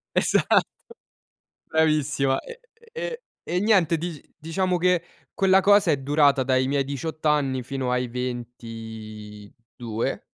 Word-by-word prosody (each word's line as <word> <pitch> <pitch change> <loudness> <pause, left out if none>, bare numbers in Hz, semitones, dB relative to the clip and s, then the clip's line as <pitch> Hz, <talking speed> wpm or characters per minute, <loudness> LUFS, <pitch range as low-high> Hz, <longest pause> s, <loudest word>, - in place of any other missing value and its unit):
Esatto - - +4 1.1
Bravissima, 150 -4 +2
ehm, 475 - -10 0.4
ehm, 480 0 -4 0.3
e 180 +1 -1
niente, 185 -6 +3
di 165 -2 -5 0.2
diciamo 180 +3 -1
che 180 -1 +2 0.3
quella 190 0 +4
cosa 200 -4 +5
è 145 - +2
durata 140 0 +3
dai 130 0 +1
miei 140 0 +1
18 155 +3 -4
anni 135 -4 +1
fino 130 -1 -3
ai 125 0 0
22. 115 -2 -6
140 Hz, 115 wpm, -24 LUFS, 125-165 Hz, 1.1 s, cosa